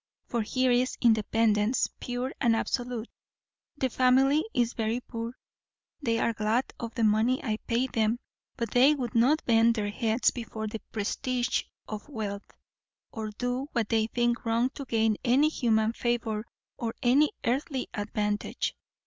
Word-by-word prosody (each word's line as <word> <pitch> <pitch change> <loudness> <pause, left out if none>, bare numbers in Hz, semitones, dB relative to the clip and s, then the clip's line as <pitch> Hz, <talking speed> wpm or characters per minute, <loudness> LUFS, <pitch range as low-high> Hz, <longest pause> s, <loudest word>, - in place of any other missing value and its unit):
For 235 - -1
here 255 +4 +1
is 250 +1 +1
independence, 220 0 +3
pure 245 +2 -3
and 235 -4 +4
absolute. 245 0 -2 0.7
The 265 - +1
family 265 +5 +4
is 240 -1 +1
very 225 +1 -1
poor; 235 0 -6 0.6
they 230 -4 +1
are 230 - +1
glad 220 +4 0
of 230 -1 -6
the 235 - 0
money 220 +4 +3
I 215 -3 -1
pay 235 +2 +2
them; 225 -2 +1 0.4
but 230 -2 -3
they 265 +5 +5
would 245 -5 -4
not 265 +7 +3
bend 230 0 +4
their 205 -2 -1
heads 225 +2 +2
before 225 -2 -5
the 215 +1 -5
prestige 245 +4 -1 0.2
of 215 +6 -7
wealth, 210 -6 -5 0.6
or 220 -1 -4
do 245 +5 -3
what 230 -4 0
they 220 -1 +2
think 240 +1 0
wrong 235 +3 +1
to 280 0 -7
gain 220 -3 +1
any 270 +5 +4
human 225 -6 +1
favour 235 -3 -1 0.3
or 230 -1 -3
any 275 +5 +4
earthly 260 +2 -1
advantage. 210 0 -2
235 Hz, 150 wpm, -28 LUFS, 220-250 Hz, 0.7 s, they